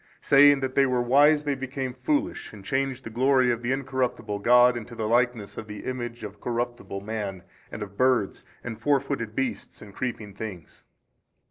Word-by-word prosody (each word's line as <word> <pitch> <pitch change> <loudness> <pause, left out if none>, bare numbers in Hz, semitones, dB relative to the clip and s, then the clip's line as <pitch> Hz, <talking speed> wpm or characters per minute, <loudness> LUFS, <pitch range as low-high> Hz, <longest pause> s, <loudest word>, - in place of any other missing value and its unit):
Saying 145 0 +6
that 130 -1 -2
they 135 0 +4
were 125 -1 +1
wise 145 +4 +5
they 145 -1 0
became 130 -1 -4
foolish 295 - -2
and 100 -2 -12
changed 135 0 -1
the 115 - -8
glory 130 +1 +3
of 120 0 -2
the 120 +1 -1
Incorruptible 125 -6 -2
God 125 +3 +5
into 120 0 -7
the 110 -1 -2
likeness 120 -2 0
of 110 - -8
the 105 -1 -7
image 120 -2 -5
of 105 - -8
corruptible 120 -4 -3
man 100 -3 -5 0.3
and 105 - -5
of 100 0 -11
birds 130 -6 +1 0.2
and 115 -2 -6
four 145 +2 +3
footed 125 -6 -4
beasts 125 -6 -3
and 100 -1 -12
creeping 110 -5 -4
things. 95 -5 -9
120 Hz, 185 wpm, -26 LUFS, 110-135 Hz, 0.3 s, Saying